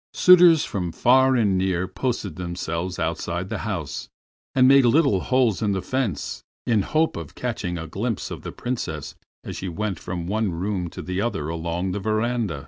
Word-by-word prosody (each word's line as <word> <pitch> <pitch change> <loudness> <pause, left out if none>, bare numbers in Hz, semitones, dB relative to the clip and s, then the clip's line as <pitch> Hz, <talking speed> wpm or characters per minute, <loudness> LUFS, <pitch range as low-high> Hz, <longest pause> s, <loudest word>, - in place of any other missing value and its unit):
Suitors 175 -4 +7
from 90 -4 -3
far 130 +6 +4
and 100 -6 +2
near 95 -1 0
posted 100 - -3
themselves 85 0 -4
outside 85 +2 -2
the 110 - -3
house, 95 -9 -4 0.5
and 130 -1 +6
made 135 0 +7
little 125 - +4
holes 125 0 +1
in 105 -2 +1
the 95 - -1
fence, 120 - -2 0.2
in 110 -3 +2
the 95 - -2
hope 160 +1 +1
of - - -7
catching 105 -8 -3
a 80 - -5
glimpse 105 +7 -3
of - - -6
the - - -6
Princess 90 - -4 0.3
as - - -6
she 95 - -4
went 95 +1 -3
from 85 -1 -5
one 105 +1 0
room 90 0 -2
to - - -8
the 95 +1 -2
other 80 -10 -2
along 85 +3 -2
the 100 - -2
veranda. 110 - -1
100 Hz, 185 wpm, -24 LUFS, 90-120 Hz, 0.5 s, Suitors